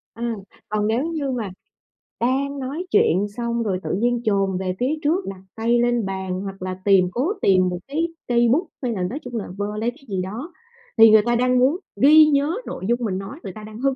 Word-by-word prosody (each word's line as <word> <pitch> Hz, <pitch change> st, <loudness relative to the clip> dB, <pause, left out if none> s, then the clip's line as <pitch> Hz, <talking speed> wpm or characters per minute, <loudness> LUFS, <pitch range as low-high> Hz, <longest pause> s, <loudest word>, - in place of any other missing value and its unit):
Ừm, 235 Hz, 0 st, -2 dB, 0.4 s
còn 210 Hz, 0 st, 0 dB
nếu 235 Hz, +6 st, +1 dB
như 310 Hz, -5 st, -2 dB
mà 230 Hz, -6 st, -3 dB, 0.7 s
đang 275 Hz, +3 st, 0 dB
nói 285 Hz, +8 st, -4 dB
chuyện 195 Hz, +5 st, +3 dB
xong 235 Hz, -1 st, -1 dB
rồi 190 Hz, -4 st, -1 dB
tự -, -, -2 dB
nhiên 240 Hz, +4 st, +1 dB
chồm 195 Hz, -3 st, +1 dB
về 185 Hz, -1 st, -2 dB
phía 265 Hz, +5 st, +1 dB
trước 340 Hz, +6 st, +1 dB
đặt 190 Hz, -1 st, -8 dB
tay 235 Hz, +2 st, +2 dB
lên 240 Hz, -2 st, +1 dB
bàn 190 Hz, -1 st, -3 dB
hoặc 195 Hz, -1 st, -7 dB
là 185 Hz, 0 st, -4 dB
tìm 195 Hz, -3 st, +5 dB
cố 275 Hz, -, 0 dB
tìm 185 Hz, -2 st, +4 dB
một 180 Hz, -1 st, -4 dB
cái 315 Hz, +4 st, -1 dB, 0.2 s
cây 240 Hz, -1 st, +3 dB
bút 330 Hz, +6 st, +2 dB, 0.2 s
hay 245 Hz, -, 0 dB
là 190 Hz, -5 st, -2 dB
nói 240 Hz, +12 st, -3 dB
chung 245 Hz, -1 st, -7 dB
là 215 Hz, -, -2 dB
vơ 205 Hz, +1 st, -3 dB
lấy 225 Hz, +2 st, 0 dB
cái 270 Hz, +2 st, -20 dB
gì 190 Hz, -2 st, -1 dB
đó, 235 Hz, -, -6 dB, 0.4 s
thì 225 Hz, 0 st, +9 dB
người 215 Hz, 0 st, +7 dB
ta 240 Hz, 0 st, +2 dB
đang 250 Hz, +1 st, +2 dB
muốn 270 Hz, +7 st, +3 dB, 0.2 s
ghi 310 Hz, +3 st, +8 dB
nhớ 295 Hz, +2 st, +2 dB
nội 185 Hz, -, -6 dB
dung 240 Hz, +2 st, +1 dB
mình 190 Hz, -3 st, -1 dB
nói, 195 Hz, +10 st, -7 dB
người 190 Hz, -, -6 dB
ta 215 Hz, -, -10 dB
đang 215 Hz, +1 st, -10 dB
hứng 270 Hz, +1 st, +1 dB
235 Hz, 230 wpm, -22 LUFS, 195-270 Hz, 0.7 s, thì